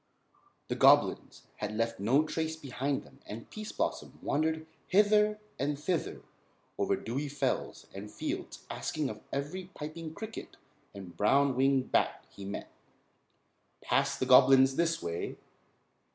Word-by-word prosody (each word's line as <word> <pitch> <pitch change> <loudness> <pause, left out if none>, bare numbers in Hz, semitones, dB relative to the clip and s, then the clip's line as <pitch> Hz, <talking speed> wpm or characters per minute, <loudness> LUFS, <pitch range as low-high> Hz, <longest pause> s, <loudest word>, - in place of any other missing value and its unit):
The - - +1
goblins - - +4
had 105 0 -4
left 115 -2 -1
no 125 +9 +4
trace 160 0 -2
behind 140 -2 -2
them - - -18
and 110 +2 -7
Pease 215 0 -6
Blossom - - -3
wandered 160 +2 0 0.2
hither 210 +1 +4 0.2
and 145 +1 0
thither 165 +3 -2 0.6
over - - +2
dewy 135 +6 -3
fells 140 0 -2
and 100 +2 -7
fields - - -5
asking 150 -4 -2
of 105 - -10
every 150 +7 -3
piping 155 +1 -6
cricket 220 0 -7 0.4
and 95 -3 -9
brown 135 +5 +3
winged 135 0 +2
bat - - +1
he 100 - -9
met: 100 - -6 1.1
"Passed - - +1
the - - +1
goblins 135 +1 +7
this 165 +1 +1
way?" 85 0 -3
140 Hz, 135 wpm, -31 LUFS, 125-160 Hz, 1.1 s, goblins